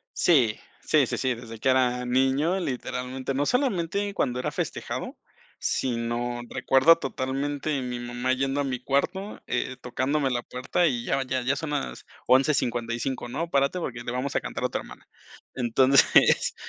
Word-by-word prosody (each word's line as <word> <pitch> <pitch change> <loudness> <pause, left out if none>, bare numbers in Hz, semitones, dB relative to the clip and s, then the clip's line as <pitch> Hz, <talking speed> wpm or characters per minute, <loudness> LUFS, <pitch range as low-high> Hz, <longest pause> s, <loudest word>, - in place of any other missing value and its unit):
Sí. 125 -11 +3 0.2
Sí, - - +3
sí, - - -3
sí, 130 -1 0
desde 115 -1 -10
que 130 - +1
era 125 -1 +2
niño, 135 +8 +2
literalmente. 130 -3 -3
No 145 +2 +1
solamente 200 - 0
cuando 125 -7 0
era - - -1
festejado, - - -4 0.4
sino, 120 -1 -1
recuerdo 135 +5 +5
totalmente 140 +1 -2
mi 125 -1 -4
mamá 120 +1 -1
yendo 135 +2 -1
a - - 0
mi 130 -2 -2
cuarto, 140 - -1
eh, 130 - -2
tocándome 130 +3 0
la 120 -1 0
puerta 125 +9 0
y 120 -5 -1
ya 135 - +1
ya 130 0 -2
ya 130 +3 +1
son 150 +1 -4
las 145 -2 -3 0.2
11:55, 125 -2 +1
¿no? 165 +7 -3
Párate 140 +6 +2
porque 125 -8 -4
le 120 - -4
vamos 130 +3 -3
a - - +3
cantar - - -5
a - - +1
tu - - -2
hermana. - - -12 0.5
Entonces, 130 +2 +4
130 Hz, 160 wpm, -26 LUFS, 125-145 Hz, 0.5 s, recuerdo